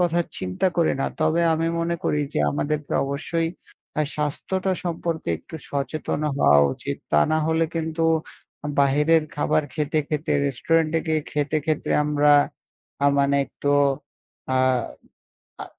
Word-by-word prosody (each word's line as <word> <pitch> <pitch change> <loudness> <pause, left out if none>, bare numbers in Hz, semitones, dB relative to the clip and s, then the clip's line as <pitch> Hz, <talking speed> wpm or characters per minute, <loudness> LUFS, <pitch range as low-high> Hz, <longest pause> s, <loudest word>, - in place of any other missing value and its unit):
কথা 175 -1 +2 0.2
চিন্তা 90 - -1
করি 170 -2 +3
না। - - +1
তবে 155 +2 +2
আমি 165 +1 0
মনে 170 +1 0
করি 150 - +1
যে - - +1
আমাদেরকে 150 0 -2
অবশ্যই 165 +4 -2 0.5
আ - - +4
স্বাস্থ্যটা 185 +6 -1
সম্পর্কে 165 - -3
একটু - - -10
সচেতন 145 +2 -2 0.2
হওয়া 75 - +6
উচিত। - - -5 0.2
তা 75 - +5
না 155 - +3
হলে 160 0 +2
কিন্তু 160 0 -2 0.8
বাহিরের 150 +4 +4
খাবার 150 +1 +2
খেতে, 155 0 0
খেতে 150 0 -1
রেস্টুরেন্টে 160 +4 +1
গিয়ে 155 -1 +1
খেতে, 150 +1 0
খেতে 155 -2 -1
আমরা 150 0 +3 0.7
আ - - +6
মানে 140 0 +3
একটু 145 - -3 0.8
আ - - +3 1.1
আ - - -9
155 Hz, 135 wpm, -23 LUFS, 145-165 Hz, 1.1 s, হওয়া